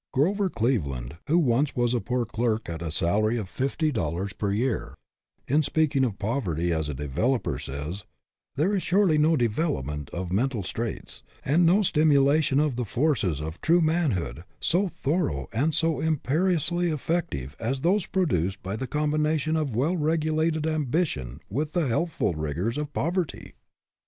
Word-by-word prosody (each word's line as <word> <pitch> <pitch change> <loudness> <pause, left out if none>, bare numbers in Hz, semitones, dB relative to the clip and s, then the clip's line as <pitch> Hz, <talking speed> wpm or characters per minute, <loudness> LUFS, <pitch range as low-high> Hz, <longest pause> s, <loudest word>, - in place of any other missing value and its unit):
Grover 190 +9 +2
Cleveland, 75 - -1
who 160 +4 +3
was 140 -2 +2
once 120 -1 +1
a 120 - +2
poor 125 -1 -1
clerk 110 0 -1
at 85 -1 -5
a 85 - -3
salary 105 +9 +2
of 105 -5 -3
fifty 140 - -1
dollars 95 - -2
a 105 - +1
year, 115 +5 -1 0.5
in 145 +4 +3
speaking 150 -2 +1
of 110 -7 -1
poverty 90 - -1
as 80 -2 -1
a 75 - -3
developer, 75 - -1
says: 75 +9 -6 0.3
" 60 0 -65
There 165 +9 +1
is 195 - +1
surely 180 -4 +3
no 155 +1 +4
development 75 - -1
of 90 0 -5
mental 115 +2 0
traits, 110 +4 -5 0.2
and 165 +5 +4
no 195 +5 +4
stimulation 145 -3 +3
of 145 -5 +1
the 125 - 0
forces 115 - 0
of 80 +2 -6
true 170 +2 +4
manhood 130 - 0 0.2
so 185 +4 +2
thorough 145 - -1
and 145 +7 +1
so 165 -1 +1
imperiously 170 +3 +1
effective 150 - -2
as 130 +4 -2
those 185 +3 +2
produced 100 - 0
by 95 +2 -3
the 130 - -4
combination 150 +1 0
of 150 -7 -1
well 145 +10 +1
regulated 155 0 +1
ambition 140 - -1
with 150 +8 -3
the 170 -5 +1
healthful 135 - 0
rigors 80 - -2
of 150 -1 -4
poverty." 175 +2 -2
135 Hz, 160 wpm, -26 LUFS, 95-160 Hz, 0.5 s, no